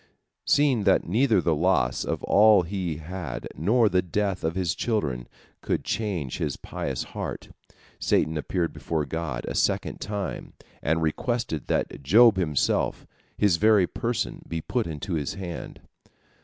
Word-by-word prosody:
Seeing 140 -7 +3
that 95 - +3
neither 110 +1 +3
the 85 - +2
loss 65 -4 +1
of - - -3
all 105 -2 +6
he 90 -3 -3
had 80 -6 -6
nor 110 +8 +3
the 95 -2 +2
death 95 +1 -2
of 80 +1 -1
his 90 -4 0
children 70 - -2 0.3
could - - -1
change 95 - -2
his - - -2
pious - - -4
heart, - - -5 0.5
Satan 80 +2 +1
appeared 85 +2 -1
before 75 +1 -2
God 80 -2 -4
a - - -3
second - - 0
time, 100 -2 -4 0.3
and 80 +2 +1
requested 80 - -2
that - - -1
Job 105 - +6
himself, 75 -7 0 0.3
his 100 -5 +3
very 105 -1 +5
person, 115 +6 -3
be 80 - -3
put 115 +7 -2
into 85 +4 -5
his 75 -4 -2
hand. 90 -4 -7
90 Hz, 145 wpm, -26 LUFS, 80-105 Hz, 0.5 s, all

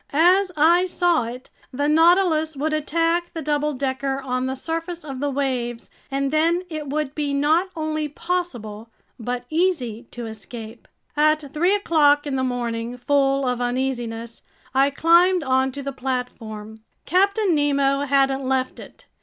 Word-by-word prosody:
As 360 +5 +4
I 340 +4 +5
saw 350 -7 +2
it, 245 +3 -8 0.2
the 285 +3 -1
Nautilus 320 -1 +3
would 305 +3 -1
attack 330 +3 0
the 325 - -3
double 295 0 0
decker 270 0 -2
on 255 -1 -2
the 265 - -2
surface 330 +4 -4
of 270 -3 -6
the 290 +1 -1
waves, 255 -4 -3 0.2
and 275 0 -1
then 335 +3 +2
it 310 -2 -5
would 295 0 -2
be 290 -2 -2
not 315 +6 +2
only 310 -1 -2
possible 255 -10 -4 0.3
but 245 +2 -4
easy 275 - 0
to 240 -1 -7
escape. 225 +1 -9 0.3
At 300 -1 +2
three 355 +6 +3
o'clock 295 -7 +3
in 285 -2 -2
the 260 - 0
morning, 240 -1 -3
full 275 +1 +1
of 250 -1 -1
uneasiness, 240 -2 -3 0.3
I 270 +1 +4
climbed 340 +4 +4
onto 265 +1 0
the 275 - -3
platform. 225 -5 -5 0.3
Captain 395 +2 +2
Nemo 280 -2 +2
hadn't 270 -1 +2
left 260 0 -1
it. - - -13
280 Hz, 150 wpm, -22 LUFS, 255-320 Hz, 0.3 s, I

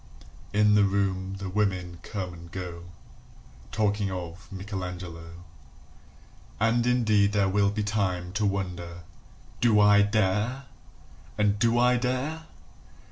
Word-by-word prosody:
In 105 0 +4
the 105 -1 +5
room 95 -1 0
the 95 0 -5
women 90 -3 -1
come 95 -3 -5
and 85 0 -12
go 85 -2 -6 0.9
Talking 105 -2 0
of 90 0 -7
Michelangelo. 90 -4 -7 1.2
And 115 +2 +2
indeed 110 -5 +3
there 100 -2 +3
will 100 +1 +2
be 105 +1 -2
time 95 -4 -1
To 105 +1 0
wonder, 90 -3 -4 0.6
"Do 110 -3 +4
I 105 0 +6
dare?" 105 +5 +1 0.7
and, 105 -1 +2
"Do 115 +1 +3
I 125 +1 +4
dare?" 130 +6 -2
100 Hz, 120 wpm, -27 LUFS, 90-105 Hz, 1.2 s, I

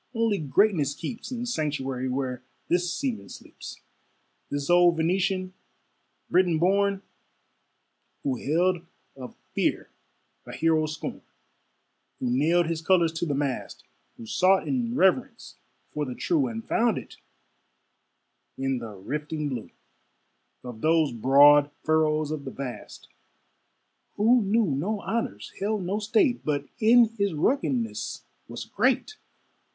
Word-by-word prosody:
only 225 -3 +1
greatness 155 -2 +2
keeps 235 +8 -7
Its 245 -1 -3
sanctuary 135 -4 -2
where 130 -1 -3 0.3
this 175 0 +1
seaman 250 +4 -3
sleeps; - - -11 0.7
This 145 -1 -3
old 175 -1 +5
Venetian, 185 +2 0 0.7
Briton 175 -2 +3
born, 200 +3 +1 1.2
Who 135 -3 -1
held 170 +5 +1 0.3
of 130 -2 -10 0.2
fear - - -1 0.6
a - - -8
hero's 155 -1 +1
scorn, - - -6 1.0
Who 125 - -1
nailed 165 +7 +3
his 160 0 -3
colors 170 -2 +3
to 170 +1 -2
the 145 - -1
mast, 140 -2 -3 0.3
Who 115 - -9
sought 185 - +2
in 245 -2 -1
reverence 190 -8 +1 0.3
for 150 - -2
the 125 -2 -6
true, 310 -7 +1
And 225 -1 -6
found 230 -2 +2
it - - -9 1.4
in 135 -1 -1
the 110 -3 -8
rifting 150 +8 -4
blue 125 -5 -5 0.9
Of 120 -3 -9
those 160 -3 +3
broad 140 +5 +6
furrows 155 -1 +1
of 155 -2 -4
the - - -5
vast: 130 -3 -8 1.1
Who 235 +4 +4
knew 215 +3 +2
no 185 +8 -2
honors, 110 - -3
held 205 0 -1
no 195 +4 -1
state, 230 +4 +1
But 145 -2 -1
in 235 0 +6
his 200 -4 0
ruggedness 245 - -1 0.2
was - - -7
great. 430 - 0
165 Hz, 125 wpm, -26 LUFS, 145-205 Hz, 1.4 s, broad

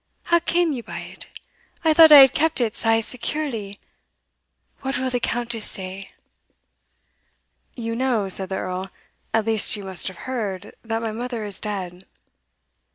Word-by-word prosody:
how 340 0 +3
came 340 0 +1
ye 260 -4 -4
by - - -8
it? - - -8 0.6
I 320 - +5
thought 320 0 +8
I 295 - +12
had 265 -2 +7
kept 320 0 +1
it 230 -4 0
sae 225 0 +2
securely 230 -5 -3 1.0
what 270 0 -2
will 260 0 -2
the 245 - 0
Countess 235 -2 -2
say?" 190 +1 -5 1.7
"You 230 -2 -4
know," 240 -5 0
said 190 0 -2
the 190 - -3
Earl, 185 +1 -4 0.4
"at 225 -1 +1
least 220 -1 +4
you 205 - -7
must 190 -2 -3
have 190 -2 -8
heard, 215 -8 -4
that 225 0 -3
my 225 - -2
mother 235 0 -5
is 200 -2 -3
dead." 190 -3 -6
225 Hz, 160 wpm, -22 LUFS, 200-260 Hz, 1.7 s, I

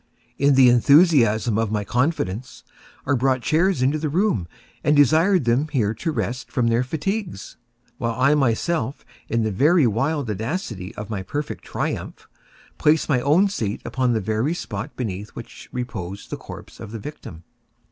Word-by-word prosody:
In 140 0 +4
the 130 -1 +7
enthusiasm 120 - +4
of 115 -2 -1
my 105 -1 -1
confidence, 125 - -2 0.4
I 140 - +1
brought 130 -1 +1
chairs 165 -3 +2
into 145 +4 +1
the 155 0 -2
room, 170 - +1 0.4
and 150 - +3
desired 160 +4 +4
them 120 +6 +2
here 120 -9 0
to 160 +9 -3
rest 125 -4 -4
from 120 -2 +1
their 115 +2 +2
fatigues, 160 - -4 0.4
while 115 +1 -2
I 140 +3 +4
myself, 135 0 0 0.2
in 115 0 +1
the 140 - +3
wild 135 +6 -1
audacity 110 - -4
of 105 +1 -7
my 100 -3 -2
perfect 145 +10 -5
triumph, - - -4 0.5
placed 155 +1 +3
my 125 -4 +2
own 155 +10 +4
seat 110 - -3
upon 125 -2 0
the 110 - 0
very 110 - -1
spot 105 - -6
beneath 105 -4 -4
which 115 - -10
reposed 100 -6 -6
the - - -2
corpse - - -11
of 115 - -8
the - - -4
victim. 100 - -9
125 Hz, 160 wpm, -22 LUFS, 110-150 Hz, 0.5 s, the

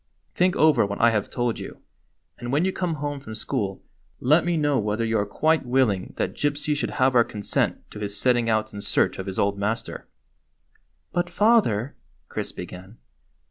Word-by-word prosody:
" - - -44
Think 180 0 +2
over 155 -1 +5
what 100 0 -3
I 115 0 +5
have 105 -2 -1
told 120 -2 -1
you, - - -8 0.6
and 120 0 -5
when 150 +6 +2
you 190 - 0
come 175 -3 -1
home 145 -1 -4
from 110 -5 -8
school 95 -3 -3 0.4
let 150 +7 +4
me 175 -1 0
know 145 -3 +2
whether 105 +2 -1
you 115 0 0
are 100 - -1
quite 160 +9 +2
willing 120 -7 +1
that - - -1
Gypsy 145 +1 -1
should 145 - -2
have 130 0 +3
our 120 -1 +6
consent 105 -3 -1
to 105 - -8
his 100 -1 -4
setting 120 +1 +2
out 110 -1 0
in 100 - -6
search - - +1
of 95 - -5
his 95 - -4
old 100 0 +1
master." 110 +3 -3 1.0
"But, 175 0 -1
father 175 - +2
— - - -38
" - - -42
Chris - - -4
began. 90 +4 -9
120 Hz, 200 wpm, -24 LUFS, 105-150 Hz, 1.0 s, our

